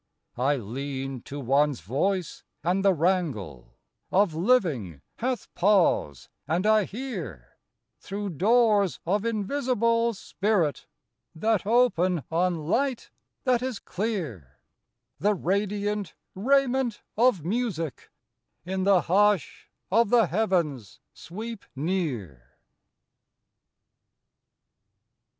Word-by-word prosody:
I 140 +3 +3
lean 135 +2 -5
to 145 - -6
one's 140 - +2
voice, 165 - -1 0.2
and 180 +4 +1
the 200 - +5
wrangle 150 - -1 0.3
Of 195 -3 +3
living 155 - +1
hath 250 +1 -3
pause: 175 - +2 0.2
and 175 +5 0
I 215 -1 +4
hear 185 - -7 0.4
Through 200 0 -5
doors 205 - +3
of 200 +5 0
invisible 230 0 +1
spirit, 195 -6 -1 0.5
That 215 +3 0
open 185 - +3
on 170 -1 0
light 260 +5 0 0.3
that 250 -3 +2
is 255 -3 -3
clear, 170 - -4 0.6
The 210 +1 +2
radiant 205 +1 -1 0.2
raiment 260 +1 +1
of 225 -8 +3
Music 180 - -2 0.6
In 190 +1 -2
the 195 -3 +5
hush 200 -2 +1 0.2
of 230 +1 +4
the 235 -2 +5
heavens 170 - -1
sweep 220 +5 -8
near. 130 - -3
190 Hz, 95 wpm, -26 LUFS, 150-220 Hz, 0.6 s, the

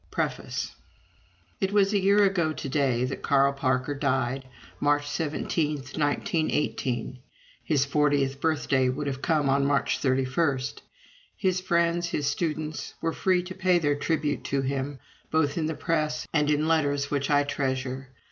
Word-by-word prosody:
_ - - -31
PREFACE - - -3 0.9
It 195 - 0
was 200 0 +3
a 205 - +3
year 200 +2 +4
ago 175 -5 +2
to 145 - -5
day 130 -3 +1
that 130 - -5
Carl 140 0 +3
Parker 130 0 0
died 135 -2 0 0.4
March 145 0 +2
17, 150 +1 -1
1918. 145 - -1 0.4
His 145 -4 +2
fortieth 140 -1 +1
birthday 145 -5 +2
would 140 +3 -3
have 135 -1 -3
come 155 -4 +1
on 140 +1 +3
March 140 0 +1
31. 135 +2 +1 0.8
His 185 -2 +1
friends, 170 -1 +1
his 150 - -1
students, 155 0 -2
were 165 0 -1
free 185 0 +2
to 185 +1 -7
pay 185 -1 +2
their 145 -4 +2
tribute 150 0 -1
to 135 -1 0
him, 135 +1 -2 0.3
both 150 -2 +1
in 160 -2 0
the 160 - -2
press 155 -2 -1
and 150 -2 +2
in 150 +1 +2
letters 145 -3 +1
which 140 -1 0
I 145 -1 +4
treasure. 135 -2 -3
145 Hz, 155 wpm, -27 LUFS, 135-160 Hz, 0.9 s, year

